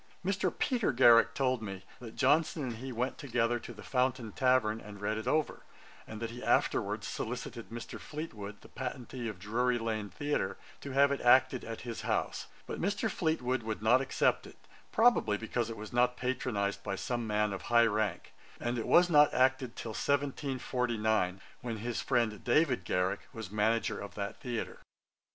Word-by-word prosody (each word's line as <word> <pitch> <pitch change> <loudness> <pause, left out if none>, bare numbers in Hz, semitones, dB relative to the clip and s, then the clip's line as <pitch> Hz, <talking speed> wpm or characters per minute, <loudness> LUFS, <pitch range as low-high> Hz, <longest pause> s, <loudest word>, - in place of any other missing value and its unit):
Mr. 195 +1 +1
Peter 245 - +1
Garrick 120 -2 +6
told 130 -3 +1
me, 95 -3 -6 0.2
that 115 -2 -10
Johnson 150 +3 +2
and 120 -3 -4
he 130 +3 -6
went 125 +2 -2
together 120 -3 0
to 120 - -9
the 105 -3 -11
Fountain 125 -1 0
tavern, 125 -4 +2
and 105 -1 -10
read 105 +1 -1
it 110 - -5
over, 155 -1 0 0.5
and 110 - -7
that 115 0 -4
he 120 +1 -8
afterwards - - +1
solicited 120 0 -5
Mr. 115 0 -7
Fleetwood, 105 -10 -7
the - - -14
patentee 125 -1 -5
of 105 -4 -5
Drury 120 +5 0
lane 110 -3 -2
theatre, 145 -2 -2 0.2
to 140 - -7
have 140 +1 +5
it 140 - -1
acted 130 +1 +5
at 115 0 -6
his 120 -1 -5
house; - - -1 0.2
but - - -5
Mr. 205 +3 0
Fleetwood 130 -9 0
would 110 -1 -4
not 125 +4 +5
accept 135 - +1
it, - - -14 0.3
probably 225 - +4
because 115 +1 -2
it 115 - -6
was 105 +1 -8
not 125 0 +3
patronized 105 -6 -1
by 100 - -3
some 120 +3 -3
man 105 -1 +1
of 95 - -5
high 120 0 +6
rank; 105 -4 -1 0.3
and 120 0 -1
it 115 - -4
was 175 +1 +6
not 150 -3 +6
acted 130 -1 +2
till 115 - -5
1749, 125 -7 0 0.2
when 115 -2 -4
his 120 +2 -3
friend 115 -5 0
David 125 - +2
Garrick 90 +1 -1
was 110 -6 -7
manager 110 0 +1
of 100 - -8
that 100 -1 -4
theatre. 120 -4 -4
120 Hz, 180 wpm, -32 LUFS, 110-130 Hz, 0.5 s, Garrick